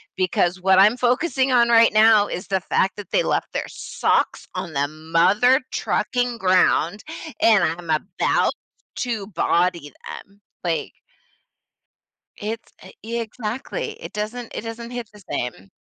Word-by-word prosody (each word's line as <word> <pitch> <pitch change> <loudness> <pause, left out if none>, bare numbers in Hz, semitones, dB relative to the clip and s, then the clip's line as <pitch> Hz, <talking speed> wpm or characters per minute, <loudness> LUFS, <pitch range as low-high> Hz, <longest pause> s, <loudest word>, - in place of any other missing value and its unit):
Because 185 -1 +1
what 190 0 +4
I'm 210 +5 +5
focusing 260 +2 +1
on 240 -2 +4
right 230 -1 +6
now 215 -1 +6
is 180 - -6
the 190 -1 0
fact 190 +1 0
that 205 - -9
they - - +3
left - - -1
their - - -2
socks - - -1
on 170 -4 -5
the 140 0 0
mother 170 - +3
trucking 245 -1 -1
ground, 185 0 +2 0.4
and 215 -5 +5
I'm 170 0 -2
about 175 +4 +1 0.4
to 225 -5 -3
body 170 -4 0 0.2
them." 200 +1 -10 0.2
Like 170 -2 -2 1.5
It's 220 +2 -6 0.3
e 230 +2 -3
exactly. 235 - -4
It - - -8
doesn't 220 +3 -5
it - - -3
doesn't 230 +1 -7
hit 245 -3 -6
the 210 - -16
same. 95 -6 -4
210 Hz, 140 wpm, -22 LUFS, 180-235 Hz, 1.5 s, right